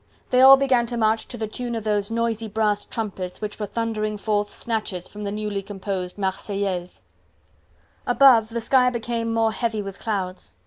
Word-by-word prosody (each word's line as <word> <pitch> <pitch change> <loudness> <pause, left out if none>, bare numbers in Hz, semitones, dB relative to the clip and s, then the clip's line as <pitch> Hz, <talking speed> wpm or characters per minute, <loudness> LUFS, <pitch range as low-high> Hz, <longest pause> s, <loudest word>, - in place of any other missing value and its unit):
They 250 - +5
all 270 +1 +10
began 260 -3 +2
to 240 0 -3
march, 220 0 +1
to 245 - -6
the 220 - -2
tune 240 +2 -4
of 225 - -4
those 210 -1 0
noisy 230 -1 -1
brass 210 -1 0
trumpets 195 -5 -5
which 210 0 -5
were 210 - -2
thundering 215 -2 -2
forth 205 0 0
snatches 215 -6 -3
from 210 0 -8
the 200 - -2
newly 210 -1 -3
composed 195 -2 -5
"Marseillaise." 190 -2 -3 1.0
Above 245 -3 +6
the 235 0 -3
sky 250 +1 +4
became 230 -1 -2
more 225 -1 +2
heavy 220 -2 -2
with 195 0 -8
clouds. 190 - -4
215 Hz, 175 wpm, -23 LUFS, 205-230 Hz, 1.0 s, all